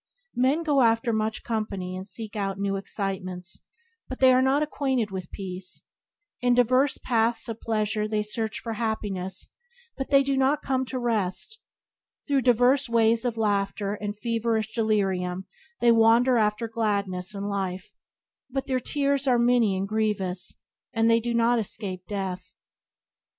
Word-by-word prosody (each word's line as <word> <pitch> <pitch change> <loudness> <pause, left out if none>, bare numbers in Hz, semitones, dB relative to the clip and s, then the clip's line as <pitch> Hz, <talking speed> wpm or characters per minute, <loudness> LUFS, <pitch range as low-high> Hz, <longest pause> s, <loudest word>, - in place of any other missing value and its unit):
Men 265 +7 +2
go 290 -4 +3
after 230 0 +3
much 220 0 -1
company 200 -5 -3
and 185 +1 -6
seek 215 +1 -7
out 195 -2 -2
new 200 0 -1
excitements, 190 -2 -4 0.5
but 260 - -6
they 260 -1 +7
are 255 - +4
not 270 +3 +3
acquainted 265 -7 -1
with 185 -3 -5
peace; 185 -1 -7 0.6
in 245 -1 +3
diverse 255 +3 +3
paths 230 -1 0
of 230 -1 -6
pleasure 215 -1 0
they 215 -1 0
search 220 +1 -3
for 230 - -4
happiness 205 -4 -3 0.5
but 270 - -4
they 275 -1 +5
do 275 0 0
not 270 +2 +2
come 260 -1 0
to 255 - -4
rest; 235 - -1 0.7
through 280 -2 +2
diverse 250 +2 +3
ways 230 +1 +3
of 235 -2 -1
laughter 200 -1 0
and 205 0 -5
feverish 225 -1 -1
delirium 190 -5 0 0.4
they 240 -1 +6
wander 230 +3 +5
after 215 0 +1
gladness 205 -4 -1
and 200 0 -3
life, 190 -2 -3 0.6
but 270 +1 -3
their 260 -1 0
tears 280 +1 0
are 250 -2 +4
many 235 -5 +3
and 195 +1 -2
grievous, 195 -4 -1 0.4
and 225 -1 +3
they 230 - +5
do 240 +1 -3
not 235 +1 +3
escape 190 -4 -5
death. 190 -3 -5
220 Hz, 155 wpm, -26 LUFS, 200-245 Hz, 0.7 s, they